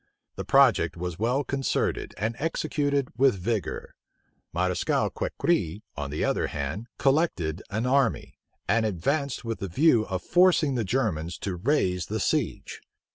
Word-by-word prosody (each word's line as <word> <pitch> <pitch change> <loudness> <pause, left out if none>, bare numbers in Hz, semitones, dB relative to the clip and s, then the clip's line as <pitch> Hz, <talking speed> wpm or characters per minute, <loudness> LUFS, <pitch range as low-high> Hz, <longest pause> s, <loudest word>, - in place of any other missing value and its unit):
The - - -4
project - - +4
was 90 0 -5
well 125 +6 +1
concerted, 135 -1 -1
and 110 +3 -2
executed 145 -3 -1
with 135 -4 +5
vigor. 100 -1 -3 0.6
Mareschal 90 +1 0
Crequi, 105 - -1
on 70 -1 -4
the 75 - -1
other - - 0
hand, 75 - -4
collected 135 - +1
an 110 +4 -2
army, 130 -2 +1 0.3
and 110 +4 +2
advanced 125 - -1
with 115 -4 -4
a 100 - -2
view 120 - +3
of 95 -2 -3
forcing 175 -5 +4
the 120 -3 0
Germans 95 -8 -1
to 95 -3 -3
raise 90 - 0
the 110 +1 -2
siege. - - -1
110 Hz, 140 wpm, -26 LUFS, 90-140 Hz, 0.6 s, with